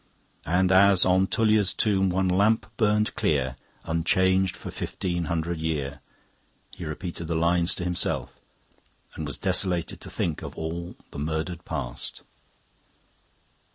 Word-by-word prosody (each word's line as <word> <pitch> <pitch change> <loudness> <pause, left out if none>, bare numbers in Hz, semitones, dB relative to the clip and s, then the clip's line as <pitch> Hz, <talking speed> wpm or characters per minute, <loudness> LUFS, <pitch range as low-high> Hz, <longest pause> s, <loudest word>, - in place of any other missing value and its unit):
"And 90 +3 +3
as 95 0 +6
on 95 +1 +3
Tullia's 105 -3 +2
tomb 95 -3 +2
one 95 +1 +1
lamp 100 +5 +3
burned 105 -1 +2
clear, 65 -4 0 0.3
Unchanged 95 +3 +2
for - - -8
fifteen 85 -2 -3
hundred 85 +1 -2
year..." 75 -4 -2 0.7
He 85 - -8
repeated 85 +1 -5
the 85 - -1
lines 85 +1 +2
to - - -4
himself, 90 -1 -1 0.7
and 80 - -5
was 75 - -2
desolated 90 -2 0
to - - -6
think 80 -3 -2
of - - -8
all 85 +2 -5 0.2
the - - -7
murdered 80 +3 -3
past. - - -4
90 Hz, 130 wpm, -26 LUFS, 80-95 Hz, 0.7 s, as